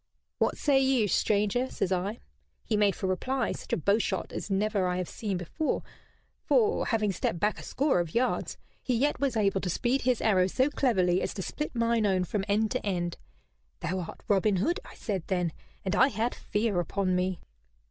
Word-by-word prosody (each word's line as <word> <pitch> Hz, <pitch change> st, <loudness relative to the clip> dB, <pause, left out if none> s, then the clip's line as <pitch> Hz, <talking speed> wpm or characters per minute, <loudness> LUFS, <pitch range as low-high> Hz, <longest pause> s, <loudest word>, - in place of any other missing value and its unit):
'What -, -, +1 dB
say 280 Hz, -2 st, +3 dB
you, 265 Hz, -5 st, +3 dB
stranger?' 210 Hz, +6 st, +1 dB
says 190 Hz, -, -2 dB
I. 190 Hz, +4 st, -1 dB, 0.4 s
He -, -, 0 dB
made 205 Hz, -2 st, +3 dB
for -, -, -4 dB
reply 255 Hz, +9 st, 0 dB
such -, -, -7 dB
a -, -, +2 dB
bowshot 200 Hz, +1 st, 0 dB
as -, -, -5 dB
never 200 Hz, -1 st, +1 dB
I 180 Hz, 0 st, -1 dB
have 180 Hz, -1 st, -2 dB
seen 205 Hz, -4 st, -3 dB
before; 180 Hz, -, -2 dB, 0.6 s
for, 450 Hz, -3 st, +2 dB
having 215 Hz, -3 st, +1 dB
stepped 170 Hz, -2 st, -2 dB
back 210 Hz, +4 st, 0 dB
a -, -, -7 dB
score 275 Hz, -7 st, +1 dB
of 170 Hz, -2 st, -3 dB
yards, 250 Hz, +2 st, 0 dB, 0.2 s
he 250 Hz, -, 0 dB
yet 285 Hz, +5 st, +1 dB
was 270 Hz, -5 st, 0 dB
able 195 Hz, -2 st, +2 dB
to 185 Hz, -, -2 dB
speed 245 Hz, +9 st, +1 dB
his 250 Hz, -2 st, +2 dB
arrow 185 Hz, -4 st, +3 dB
so 260 Hz, +9 st, +1 dB
cleverly 185 Hz, -11 st, +2 dB
as -, -, -3 dB
to 190 Hz, -, -3 dB
split 300 Hz, +5 st, -4 dB
mine 230 Hz, -2 st, +2 dB
own 185 Hz, -2 st, +2 dB
from 195 Hz, +3 st, -2 dB
end 215 Hz, +1 st, +1 dB
to -, -, -1 dB
end. 175 Hz, -4 st, -2 dB, 0.6 s
'Thou 185 Hz, +3 st, -1 dB
art 175 Hz, -, -7 dB
Robin 200 Hz, 0 st, +3 dB
Hood,' 330 Hz, -, +1 dB
I -, -, -13 dB
said 195 Hz, -4 st, -3 dB
then, 180 Hz, -4 st, 0 dB, 0.3 s
and 190 Hz, +1 st, 0 dB
I 260 Hz, -, +6 dB
had 240 Hz, -2 st, -1 dB
fear 210 Hz, -3 st, -1 dB
upon 185 Hz, +2 st, 0 dB
me." 180 Hz, 0 st, 0 dB
205 Hz, 200 wpm, -29 LUFS, 185-240 Hz, 0.6 s, I